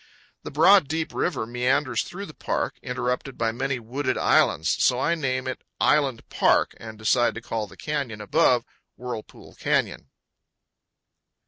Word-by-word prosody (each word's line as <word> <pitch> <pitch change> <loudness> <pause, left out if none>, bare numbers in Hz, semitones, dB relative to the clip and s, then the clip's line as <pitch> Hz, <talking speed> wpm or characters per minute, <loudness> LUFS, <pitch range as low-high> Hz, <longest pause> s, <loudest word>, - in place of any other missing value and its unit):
The - - -7
broad, 165 +3 +5
deep 160 +2 -3
river 175 -10 -1
meanders 125 +4 0
through 195 +3 -7
the 155 - -11
park, - - -2
interrupted 125 +1 -3
by 115 -1 +1
many 135 +3 -2
wooded 125 +5 -2
islands; - - +2
so 125 - +3
I 165 - +2
name 130 -5 -1
it 130 - -5 0.2
Island 140 -6 +2
Park, - - +2
and 110 -1 -9
decide 120 +3 +2
to - - -4
call 110 -2 -3
the - - -16
canyon 140 -8 -3
above, 125 +1 +2 0.3
Whirlpool 120 -3 -8
Canyon. - - 0
130 Hz, 145 wpm, -25 LUFS, 120-150 Hz, 0.3 s, broad